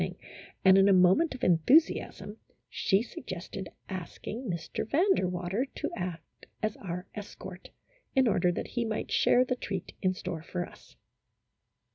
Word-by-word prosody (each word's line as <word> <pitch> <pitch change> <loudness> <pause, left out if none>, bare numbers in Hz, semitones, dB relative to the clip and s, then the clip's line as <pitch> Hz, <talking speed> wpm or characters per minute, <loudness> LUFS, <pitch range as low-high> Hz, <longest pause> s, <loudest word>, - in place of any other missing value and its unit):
ing, - - -2 0.5
and 190 0 +8
in 195 +1 +6
a - - +6
moment 190 - +5
of 255 - -11
enthusiasm 210 - +3 0.3
she 195 +2 +2
suggested 185 -4 -7 0.2
asking 190 +5 -6
Mr. 170 -2 -3
Van 325 +6 +3
der 190 - 0
Water 180 +8 -2
to - - -3
act 175 -3 -7 0.2
as 215 -1 0
our 180 -1 -5
escort, 190 -3 -9 0.5
in 265 -2 +5
order 180 -4 +3
that - - -4
he 240 - -1
might 220 -1 -3
share 250 +1 +4
the 250 - 0
treat 195 -7 -5
in 185 - +3
store 180 -4 -5
for 175 +2 -4
us. - - -17
190 Hz, 155 wpm, -30 LUFS, 180-230 Hz, 0.5 s, and